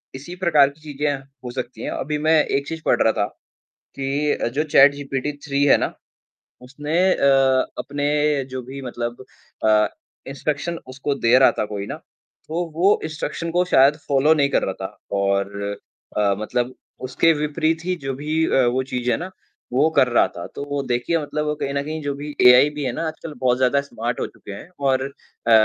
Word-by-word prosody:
इसी 160 +7 -8
प्रकार 155 -7 +4
की 150 +2 -19
चीज़े 145 -1 -2 0.3
हो 125 - -5
सकती 125 0 -6
है, - - -3
अभी 150 +2 -2
मैं 160 -2 +5
एक 140 +1 -1
चीज़ 165 -1 -5
पढ़ - - +3
रहा - - +4
था - - +1 0.7
कि 140 +2 0 0.2
जो 150 - +1
चैट 145 -2 +6
जीपीटी 140 0 -3
थ्री 140 0 +1
है 145 - +6
ना। - - -1 0.7
उसने 145 +5 -4 0.2
अ, 135 -1 +3
अपने 145 0 -2 0.5
जो 130 - -3
भी 135 +1 -7
मतलब 120 0 -5 0.4
अ, 105 0 +4 0.4
इंस्ट्रक्शन 150 +4 -3
उसको 140 +2 -2
दे 120 -1 +4
रहा 135 - +6
था - - 0
कोई 100 -1 -5
ना। - - -4 0.5
तो 170 +3 -2
वो 195 +5 +4
इंस्ट्रक्शन 155 +1 -4
को 180 +1 +2
शायद 140 -3 +5
फॉलो 145 +3 +4
नहीं 140 -2 +2
कर - - +1
रहा 95 - -1
था। 95 - -6 0.2
और 100 +1 0 0.6
अ, 100 -1 +3
मतलब 120 +3 -2 0.3
उसके 165 +6 +3
विपरीत 155 +2 -1
ही 185 0 0
जो 135 - -1
भी 155 +3 0
अ, 130 -2 +3
वो 130 +2 +1
चीज़ 125 -2 -3
है - - +1
ना 185 +2 -6 0.4
वो 145 +5 +4
कर 130 - +6
रहा 120 - +3
था। 85 - -6
तो 140 - -4
वो 145 -1 -1
देखिए 125 +8 +1
मतलब 150 +1 -3
वो 150 0 -1
कहीं 140 -1 -3
न 140 0 -1
कहीं 155 +1 -5
जो 145 -1 -2
भी 145 +1 -7
एआई 125 +4 +8
भी 145 - -3
है 125 - 0
ना 165 - -2
आजकल 155 0 -7
बहुत 125 -1 +2
ज़्यादा 130 +2 +2
स्मार्ट 120 -3 -4
हो - - -1
चुके - - -12
हैं। 100 - -9 0.2
और 130 0 +2 0.4
अ, - - +4
140 Hz, 200 wpm, -22 LUFS, 125-150 Hz, 0.7 s, एआई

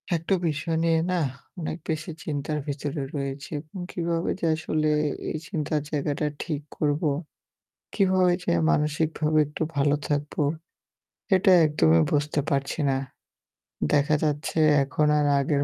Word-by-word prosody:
একটা 165 +4 +1
বিষয় 160 +2 -1
নিয়ে 165 -1 +3
না 180 - +1 0.4
অনেক 160 -1 -3
বেশি 155 +1 -2
চিন্তার 150 0 -2
ভিতরে 145 +1 -3
রয়েছি। 140 0 -4
এবং 155 +5 -12
কিভাবে 170 -1 -1
যে - - -1
আসলে 155 -1 -1 0.4
এই - - -2
চিন্তার 155 -4 -1
জায়গাটা 150 0 -1 0.2
ঠিক 150 -3 -3 0.2
করব, 145 0 0 0.9
কিভাবে 185 -3 +3
যে - - 0 0.2
মানসিকভাবে 155 - +1
একটু 150 +2 -3
ভালো 145 +1 +3
থাকব, 145 0 -1 1.0
এটা 190 +1 +4
একদমই 80 - +4
বুঝতে 150 0 +1
পারছি 140 +1 -1
না। 135 - +2 1.0
দেখা 145 +1 +3
যাচ্ছে 150 +1 -1 0.2
এখন 145 +3 0
আর 150 - +2
আগের 140 +1 +1
150 Hz, 130 wpm, -26 LUFS, 145-160 Hz, 1.0 s, এটা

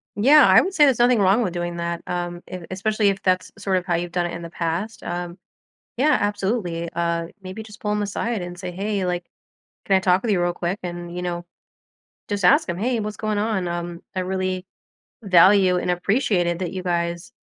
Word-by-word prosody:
Yeah. 275 +8 +7
I 190 - +7
would 380 - -3
say 300 -5 +6
there's 265 -4 +3
nothing 240 -1 +4
wrong 200 +4 +4
with 185 -5 -2
doing 175 0 -3
that, 170 0 -3
um, 175 0 -3
e 185 - -5
especially 210 +2 +1
if 195 0 -2
that's 185 -1 0
sort 195 -2 0
of 180 - -3
how 175 -2 +1
you've 175 +1 -3
done 175 0 0
it 175 - -4
in 170 - -6
the 170 - -7
past. 175 +6 -3
Um, 175 +1 -4 0.6
yeah, 290 +5 +3
absolutely. 195 -4 -1
Uh, 170 0 -1
maybe 190 +4 -7
just 210 -1 -13
pull 210 - -1
him 210 0 0
aside 205 +1 -2
and 175 0 -7
say, 180 - -5
"Hey, 195 +1 -2
like, 175 -1 -2 0.6
can 195 - +3
I - - +3
talk 185 0 +3
with 235 - -1
you 190 -4 +2
real 175 0 +1
quick?" 175 +3 -2
And, 175 -1 -6
you 180 - -4
know, 175 -1 -3 0.8
just 200 -3 -1
ask 180 - +5
him, 170 -1 -3
"Hey, 235 +4 0
what's 210 0 -4
going 215 -1 -2
on? 210 -4 0
Um, 175 0 -4
I 185 - 0
really 185 0 -2 0.6
value 185 -1 +5
and 180 - -1
appreciated 180 -2 +1
that 180 -3 -3
you 185 - -4
guys, 170 +2 -2
185 Hz, 215 wpm, -23 LUFS, 175-205 Hz, 0.8 s, Yeah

